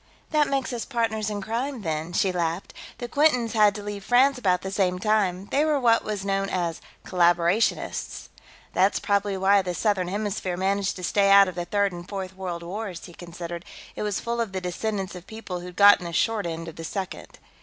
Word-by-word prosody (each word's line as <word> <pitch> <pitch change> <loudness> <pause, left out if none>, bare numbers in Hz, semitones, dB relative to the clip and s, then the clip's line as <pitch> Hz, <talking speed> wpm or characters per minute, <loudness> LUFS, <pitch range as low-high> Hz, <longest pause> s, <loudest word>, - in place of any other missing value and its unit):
"That 300 -2 +3
makes 270 -2 -1
us 235 - -3
partners 220 -4 -1
in 205 -1 -4
crime, 240 +3 -3
then," 160 0 -3
she 185 +2 +1
laughed. 170 0 -2 0.2
"The 240 - -5
Quintons 250 -4 +2
had 210 -2 +4
to 205 - -6
leave 205 -1 -6
France 255 +5 +4
about 180 -6 +1
the 190 - -4
same 185 -2 +1
time; 195 -2 +1
they 285 - +3
were 305 -2 +2
what 230 -3 +3
was 205 -2 -4
known 195 0 0
as 170 -3 -2 0.2
collaborationists." 175 +3 +1 0.4
"That's 195 +2 +3
probably 200 -1 0
why 195 +1 +4
the 180 -2 -4
Southern 200 -4 +1
Hemisphere 195 -2 -2
managed 195 +1 0
to 180 - -8
stay 200 +2 +2
out 200 0 +8
of 185 - -4
the 175 0 -4
Third 200 +1 +1
and 175 +1 -9
Fourth 190 -2 -5
World 180 -3 -5
Wars," 185 0 -6
he 175 - -12
considered. 170 0 -7 0.3
"It - - -5
was 210 -2 -1
full 235 0 -2
of 215 -4 -3
the 190 - -1
descendants 190 +2 -3
of 180 0 -10
people 220 -5 -6
who'd 180 0 -9
gotten 200 -2 +7
the 170 - -5
short 215 0 +1
end 165 0 -5
of 165 - -9
the 165 - -6
Second." 190 +2 -6
195 Hz, 210 wpm, -25 LUFS, 180-215 Hz, 0.4 s, out